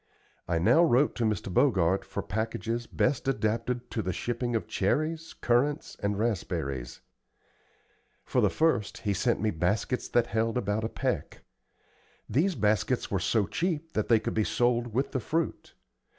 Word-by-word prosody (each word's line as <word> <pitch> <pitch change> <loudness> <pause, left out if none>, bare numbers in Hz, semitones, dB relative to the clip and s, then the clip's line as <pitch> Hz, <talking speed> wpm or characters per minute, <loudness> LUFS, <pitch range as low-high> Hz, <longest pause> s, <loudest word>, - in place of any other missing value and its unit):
I 85 - +1
now 160 - +5
wrote 145 -2 +3
to 120 - +1
Mr. 105 -3 -1
Bogart 95 -7 +3
for - - -5
packages 115 +2 -3
best 140 - 0
adapted 120 0 -1
to 110 - -1
the 95 - -2
shipping 120 +4 -2
of 115 - -1
cherries, 155 +10 -1
currants, 135 +5 +1
and 100 0 0
raspberries. 70 - -2 1.2
For - - +1
the - - +4
first 115 -11 0
he 100 - 0
sent 115 +5 0
me 110 0 +1
baskets 100 +9 -1
that 120 -1 +3
held 115 +1 0
about 105 -1 -1
a 110 - -1
peck. - - -3 0.8
These 175 +7 +1
baskets 110 +3 +1
were 100 - +1
so 105 +3 +1
cheap 165 - -2
that 110 - 0
they 115 -2 +5
could 110 - -3
be 110 - +2
sold 120 +1 +1
with 130 +6 -1
the 130 - -1
fruit. 160 +7 -3
115 Hz, 160 wpm, -28 LUFS, 105-130 Hz, 1.2 s, now